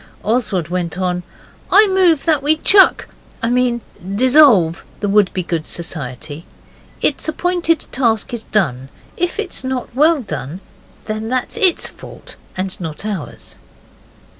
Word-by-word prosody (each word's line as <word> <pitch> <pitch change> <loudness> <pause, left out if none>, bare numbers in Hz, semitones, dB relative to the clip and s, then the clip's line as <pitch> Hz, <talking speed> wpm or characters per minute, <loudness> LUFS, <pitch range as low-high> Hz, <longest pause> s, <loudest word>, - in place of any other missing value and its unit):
Oswald 210 -7 0
went 175 -2 -3
on: 180 -1 -1 0.5
'I 425 0 +7
move 360 -6 +3
that 310 -4 +2
we 305 +3 +2
chuck 385 +4 +5 0.4
I 230 - +1
mean 245 -1 +1 0.3
dissolve 245 - +5 0.2
the 205 - -1
Wouldbegoods 185 -5 +1
Society; 150 -2 -4 0.6
its - - +1
appointed 340 -1 0
task 230 -4 0
is 230 -2 -5
done. 135 - -1 0.3
If 350 +3 -2
it's 410 -9 -4
not 260 -2 -4
well 300 +2 +3
done, 170 - -6 0.5
that's 220 +4 -2
ITS 380 -6 +2
fault - - -11 0.2
and 185 0 -3
not 160 +3 -6
ours. 200 -7 -5
225 Hz, 125 wpm, -18 LUFS, -, 0.6 s, I